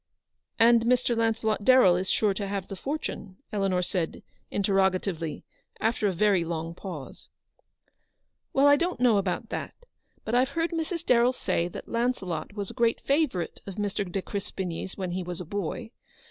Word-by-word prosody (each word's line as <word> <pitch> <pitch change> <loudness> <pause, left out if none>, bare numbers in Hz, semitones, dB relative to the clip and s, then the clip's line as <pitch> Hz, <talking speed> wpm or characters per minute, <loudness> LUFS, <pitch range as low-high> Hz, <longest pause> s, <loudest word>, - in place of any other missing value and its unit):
" - - -34
And 230 0 +6
Mr. 245 0 +3
Launcelot 225 -2 0
Darrell 255 -7 +6
is 185 +1 -1
sure 210 -2 +2
to 200 +1 -3
have 195 -2 -3
the 195 - -5
fortune? 210 -7 -5
" - - -28
Eleanor 195 -3 +1
said, 175 -2 -2 0.3
interrogatively, 190 -4 0 0.3
after 220 -1 +1
a - - +2
very 190 0 +3
long 165 0 -3
pause. 170 -7 -8 0.6
" - - -50
Well, 275 +1 +4
I 285 0 +7
don't 350 +4 -1
know 245 -4 +5
about 190 -2 -2
that; - - -4 0.5
but 220 - -3
I've 250 +2 +4
heard 330 +1 +1
Mrs. 335 +1 -3
Darrell 245 +1 +4
say 170 -8 0
that 175 - -8
Launcelot 220 -9 -2
was 200 -2 -4
a - - -11
great 235 -1 +2
favourite 275 - 0
of 195 - -6
Mr. 205 -2 -2
de 195 +1 -2
Crespigny's 190 -3 -4
when 185 -3 -3
he 185 +1 -2
was 175 -1 -5
a 180 - -5
boy. 205 +5 -4
200 Hz, 175 wpm, -27 LUFS, 180-235 Hz, 0.6 s, I